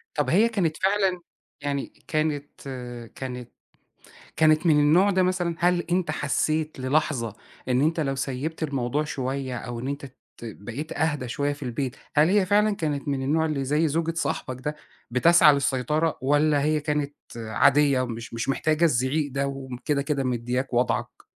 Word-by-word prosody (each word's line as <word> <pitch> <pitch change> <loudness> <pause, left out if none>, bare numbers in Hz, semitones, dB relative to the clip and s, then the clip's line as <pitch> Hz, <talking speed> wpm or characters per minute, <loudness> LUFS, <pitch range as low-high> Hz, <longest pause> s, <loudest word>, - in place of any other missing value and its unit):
طَب 150 - 0
هي 215 +7 +4
كانت 175 -8 0
فعلًا 190 -2 +1 0.4
يعني 140 -1 -3
كانت 155 -2 0 0.7
كانت 125 -2 -6 0.9
كانت 155 +1 +4
من 155 -3 +5
النوع 170 +7 +5
ده 190 -1 +2
مثلًا؟ 180 -2 0
هل 175 0 +3
أنت 175 -2 +1
حسيت 155 +1 -1
للحظة 130 -5 0 0.3
إن 125 0 +2
أنت 160 +3 +1
لو 135 -3 0
سيّبت 135 +5 -4
الموضوع 140 -1 -1
شوية 130 -2 -3
أو 120 0 -5
إن 130 - -4
أنت 140 0 -4 0.3
ت - - -11
بقيت 120 +7 -6
أهدا 150 -4 -1
شوية 145 +4 -1
في 145 +1 -10
البيت، 125 0 -3 0.2
هل 150 +2 +6
هي 195 0 +3
فعلًا 210 +1 +3
كانت 150 -4 -2
من 140 -2 -1
النوع 155 +4 +1
اللي 145 -3 -1
زَي 150 +4 +2
زوجة 165 +2 -1
صاحبك 130 -5 -2
ده 150 +1 -2 0.3
بتسعى 150 +5 +6
للسيطرة؟ 140 +4 0
والّا 145 +1 +3
هي 155 +1 +1
كانت 150 -1 -2 0.2
عادية 135 +5 +3
ومش 115 -2 -5
مش 115 +2 -3
محتاجة 155 +4 +1
الزعيق 145 0 +1
ده، 140 +1 0
وم 135 -2 -6
كده 145 -2 +1
كده 140 -1 -1
مدّياك 125 +1 -2
وضعك؟ 125 +1 -1
145 Hz, 165 wpm, -25 LUFS, 130-160 Hz, 0.9 s, هل